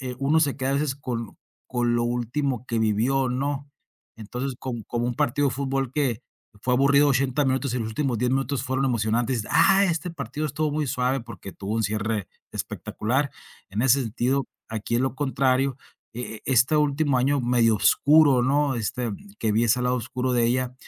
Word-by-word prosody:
eh, 130 -1 -5
uno 145 +4 +2
se 145 -4 +1
queda 135 0 -1
a - - +1
veces 140 -1 0
con 120 -5 -5 0.3
con 120 -1 +1
lo 120 - +1
último 125 +2 -2
que 115 -3 -1
vivió, 115 +5 +1
¿no? 140 +3 -2 0.5
Entonces, 125 +5 -5
com 120 -4 -4
como 120 0 -2
un 120 - -2
partido 140 +4 +1
de - - -3
fútbol 135 -1 -1
que 130 -5 -1 0.4
fue 125 - 0
aburrido 140 +2 +4
80 135 +1 +1
minutos 130 -1 0
y - - 0
los 110 - -3
últimos 125 +2 -1
10 125 +2 +1
minutos 135 0 0
fueron 130 +1 0
emocionantes: 115 0 0
"Ah, 195 +1 +5
este 170 -1 -1
partido 155 -2 -4
estuvo 150 +1 -1
muy 150 -1 -1
suave, 125 +1 0
porque 115 -4 -9
tuvo 100 +2 -5
un 115 - 0
cierre 105 -1 -2 0.2
espectacular". 130 +6 -2 0.4
En 105 +4 -1
ese 135 +1 +4
sentido, 125 +4 -1 0.2
aquí 110 +1 -3
es - - +1
lo 130 -1 -1
contrario, 135 -1 +1 0.4
e 120 -1 -5
eh, - - -16
este 130 +3 +3
último 145 -2 +2
año 140 +3 +2
medio 120 -2 +3
oscuro, 145 +3 +5
¿no?, 140 +1 +2
este, 120 +1 -2 0.3
que 110 - +1
vi 115 +3 +2
ese 120 +2 +2
lado 125 +1 +1
oscuro 125 +1 -2
de 120 -1 +3
ella, 125 +1 0
130 Hz, 190 wpm, -25 LUFS, 120-140 Hz, 0.5 s, Ah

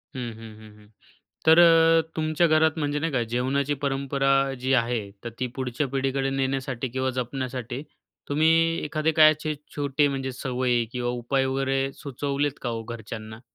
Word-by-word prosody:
हं, 125 -2 -4
हं, 110 -1 -11
हं, 110 -1 -13
हं. 105 0 -19 0.6
तर 160 +1 +8
अ, 165 -1 +6
तुमच्या 155 +2 +2
घरात 155 0 +3
म्हणजे 145 -1 -1
नाही 165 +2 -1
का, 130 -3 +1
जेवणाची 135 +3 0
परंपरा 135 0 0 0.3
जी 130 +2 0
आहे 120 -1 +2 0.2
तर 120 - -4
ती 130 - -1
पुढच्या 130 +2 -2
पिढीकडे 135 0 -1
नेण्यासाठी 135 -1 -2
किंवा 130 +2 -1
जपण्यासाठी, 125 0 -4 0.5
तुम्ही 155 +3 +3 0.3
एखादे 155 +1 0
काय 155 -1 +7
असे 155 0 -4 0.2
छोटे 145 0 +1
म्हणजे 135 -1 -3
सवयी 125 -2 -1
किंवा 125 -1 -2
उपाय 125 +3 0
वगैरे 135 0 0
सुचवलेत 140 +1 -3
का 120 - -2
हो 115 -1 -4
घरच्यांना? 110 -1 -8
135 Hz, 160 wpm, -25 LUFS, 125-145 Hz, 0.6 s, तर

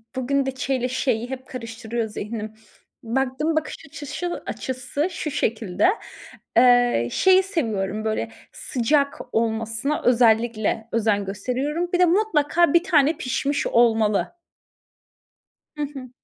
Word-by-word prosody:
bugün 270 +2 0
de 265 - -1
ç 260 - -5
ile 255 -2 +1
ş'yi 245 -2 -1
hep 260 -1 -7
karıştırıyor 230 -1 -4
zihnim. 215 +1 -6 0.5
Baktığım 265 +6 -1
bakış 315 - -1
açışı 325 +4 -5
açısı 260 +4 -3
şu 310 -3 -4
şekilde. 225 - 0 0.7
Eee, 245 - +5
şeyi 375 0 +5
seviyorum 215 - -2
böyle 115 - -2 0.2
sıcak 280 +3 0
olmasına 225 +5 0
özellikle 225 -2 +2
özen 210 -3 +1
gösteriyorum. 260 - -2
Bir 360 - +2
de 360 - +7
mutlaka 345 -4 +2
1 340 - +5
tane 305 -4 +3
pişmiş 280 +3 -1
olmalı. 225 0 +2 1.4
Hı - - -3
hı. 275 -3 -7
255 Hz, 120 wpm, -23 LUFS, 225-295 Hz, 1.4 s, de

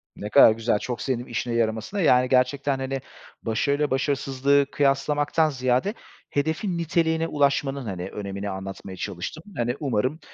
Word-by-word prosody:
Ne 105 - -6
kadar 140 -3 +8
güzel, 110 -1 0
çok 120 -2 -4
sevindim 125 -2 -2
işine 120 0 -3
yaramasına. 115 - -1
Yani, 125 -5 +4
gerçekten, 135 +2 +2
hani, 135 0 -3 0.4
başarıyla 140 +6 0
başarısızlığı 140 +1 +2
kıyaslamaktan 145 +2 +2
ziyade 130 - 0 0.4
hedefin 160 +6 -1
niteliğine 165 -1 +1
ulaşmanın, 140 -3 0
hani, 95 -2 -4
önemini 100 0 -5
anlatmaya 95 0 -7
çalıştım. 100 - -5
Hani, 120 +1 0
umarım, 130 +2 -1
130 Hz, 135 wpm, -25 LUFS, 115-145 Hz, 0.4 s, kadar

